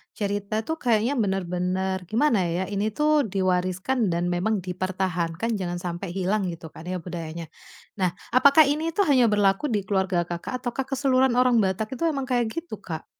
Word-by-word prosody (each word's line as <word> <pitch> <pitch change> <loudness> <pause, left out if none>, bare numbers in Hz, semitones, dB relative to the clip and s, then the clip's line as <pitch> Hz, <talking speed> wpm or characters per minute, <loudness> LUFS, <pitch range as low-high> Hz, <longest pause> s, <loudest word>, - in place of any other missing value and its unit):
cerita 205 0 -2
tuh 320 +6 -4
kayaknya 230 +1 +2
bener-bener 190 -1 -1
gimana 230 - +2 0.2
ya, 185 - 0
ini 205 +2 0
tuh 300 -3 +3
diwariskan 185 +5 0
dan 175 0 0
memang 190 +2 0
dipertahankan 185 +1 -2
jangan 175 -1 -3
sampai 175 +2 -4
hilang 195 +1 0
gitu 165 -2 -7
kan 170 - -11
ya 180 -2 -4
budayanya. 165 -2 -6 0.5
Nah 180 -2 +1 0.2
apakah 280 +4 +7
ini 295 +2 0
tuh 400 - +4
hanya 255 -4 +5
berlaku 205 +4 +2
di 210 -6 -1
keluarga 190 -2 0
Kakak 175 +8 -4
ataukah 255 +1 -2
keseluruhan 265 -2 +2
orang 250 -2 +4
Batak 195 +2 0
itu - - -2
emang 280 -4 -1
kayak 245 -3 0
gitu, 335 +1 -5
Kak? - - -6
195 Hz, 170 wpm, -25 LUFS, 180-250 Hz, 0.5 s, apakah